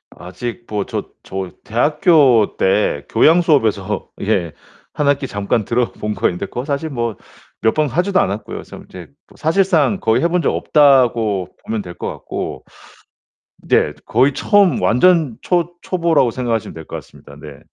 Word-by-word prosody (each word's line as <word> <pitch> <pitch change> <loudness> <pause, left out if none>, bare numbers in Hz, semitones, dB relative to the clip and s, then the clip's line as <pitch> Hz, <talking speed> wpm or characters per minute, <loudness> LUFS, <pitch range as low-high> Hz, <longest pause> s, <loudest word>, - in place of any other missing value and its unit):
아직 115 +7 -7
뭐 105 -2 -2
저 - - -4 0.2
저 95 -1 -5
대학교 135 - +3
때 95 -6 +1
교양수업에서 115 - +2
예 95 -6 -1 0.4
1 145 - -1
학기 140 -1 +1
잠깐 100 +2 -1
들어본 115 -2 -2
거 - - +1
있는데 90 +2 -4
그거 125 +6 -5
사실 145 +2 -2
뭐 115 -5 -3 0.5
몇 110 0 +2
번 155 -1 +2
하지도 185 +6 +1
않았고요. 100 +3 -2
그래서 - - -10
이제 90 -2 -10 0.3
사실상 180 +1 +2
거의 115 -3 +1
해 - - +4
본 180 +1 +1
적 - - +1
없다고 120 - +3 0.2
보면 110 -1 -2
될 90 - -9
것 - - -4
같고. - - -6 1.0
네 - - +2
거의 130 +5 +2
처음 200 - +3
완전 155 0 +3
초 175 -1 0
초보라고 165 -8 +1
생각하시면 115 -3 -2
될 80 - -9
것 - - -6
같습니다. - - -14
네. 75 -2 -11
120 Hz, 295 characters per minute, -18 LUFS, 105-155 Hz, 1.0 s, 해